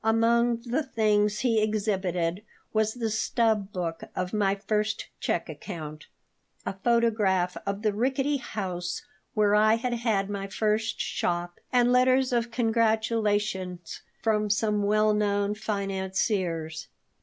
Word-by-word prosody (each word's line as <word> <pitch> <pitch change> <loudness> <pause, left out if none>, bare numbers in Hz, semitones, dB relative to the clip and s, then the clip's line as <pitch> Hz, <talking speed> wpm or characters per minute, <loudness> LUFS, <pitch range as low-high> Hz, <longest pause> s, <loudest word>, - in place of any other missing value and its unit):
Among 230 +1 +3
the 245 +5 -1
things 210 -5 +1
he 230 -3 +2
exhibited 190 -5 0 0.3
was 220 +1 +1
the 230 -3 -2
stub 220 -2 +1
book 170 -3 -3
of 180 0 -3
my 200 -2 +2
first 210 +2 -2
check - - -1
account, 155 -5 -7 0.6
a - - -2
photograph 205 -4 +2
of 200 +2 -2
the 215 -2 +2
rickety 270 +6 +1
house 185 -8 -4 0.3
where 210 -1 +3
I 215 +1 +5
had 245 +1 -2
had 225 -5 0
my 200 -1 -4
first 215 +2 0
shop, 175 0 -2
and 245 -1 +4
letters 255 +1 +4
of 235 0 +1
congratulation 220 -5 +1 0.5
from 215 -2 +1
some 210 0 +1
well 215 +1 +3
known 205 -1 +1
financiers. 190 -5 -2
210 Hz, 125 wpm, -27 LUFS, 195-230 Hz, 0.6 s, I